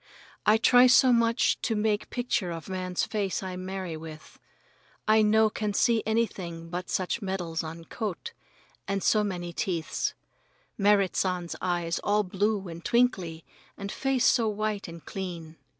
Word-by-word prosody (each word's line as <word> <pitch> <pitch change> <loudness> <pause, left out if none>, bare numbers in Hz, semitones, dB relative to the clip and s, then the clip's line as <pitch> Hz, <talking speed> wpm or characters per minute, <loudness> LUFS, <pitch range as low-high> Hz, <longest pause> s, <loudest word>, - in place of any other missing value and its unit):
I 215 +1 +6
try 245 +2 +6
so 255 0 +6
much 230 0 +2
to 225 - 0
make 210 0 0
picture 240 -7 -1
of 165 -2 -6
man's 185 -1 -2
face 200 -3 -2
I 185 -1 -5
marry 185 -2 -5
with. 155 -1 -11 0.7
I 215 0 +5
no 220 +1 +4
can 210 -2 -2
see 230 0 +3
anything 175 -7 -2
but 180 +1 -4
much 185 +5 -2
medals 175 -4 -3
on 165 +1 -8
coat, 220 - -5 0.5
and 195 -1 -1
so 215 -1 +3
many 175 -4 -4
teeths. 170 -2 -2 0.6
Merrit 200 -2 +3
San's 180 -2 -1
eyes 175 -2 -1
all 210 +1 +2
blue 200 +1 -1
and 170 0 -8
twinkly, 190 -10 +1 0.3
and 200 0 -5
face 270 -2 0
so 230 -3 +4
white 210 -1 -2
and 170 -1 -10
clean. 170 -4 -6
195 Hz, 150 wpm, -28 LUFS, 175-220 Hz, 0.7 s, I